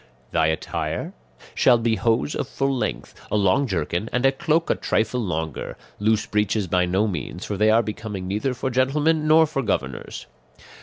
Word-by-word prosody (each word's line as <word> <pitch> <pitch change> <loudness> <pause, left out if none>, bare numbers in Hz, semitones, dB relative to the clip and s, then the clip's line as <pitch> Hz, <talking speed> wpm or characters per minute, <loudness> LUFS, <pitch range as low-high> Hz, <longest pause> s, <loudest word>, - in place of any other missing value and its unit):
"Thy 80 -1 +2
attire 80 0 -3 0.4
shall 125 -2 +5
be 115 -1 +1
hose 115 +7 +1
of - - -3
full 135 0 -1
length, 125 - -3 0.2
a - - +1
long 100 +7 +2
jerkin, 90 +2 -2
and 125 +1 0
a 135 - +6
cloak 160 +4 0
a - - +5
trifle 110 +3 0
longer; 80 - -4 0.2
loose 110 +1 +2
breeches 105 0 0
by 90 0 +1
no 95 +5 +1
means, 90 -1 -5
for 105 - -3
they 105 +2 +3
are 115 +2 +4
becoming 105 -3 -5
neither 105 +7 -1
for 130 +2 -3
gentlemen 150 +5 +2
nor 160 +1 +6
for 145 -3 -2
governors. 70 - -3
110 Hz, 175 wpm, -23 LUFS, 95-130 Hz, 0.4 s, a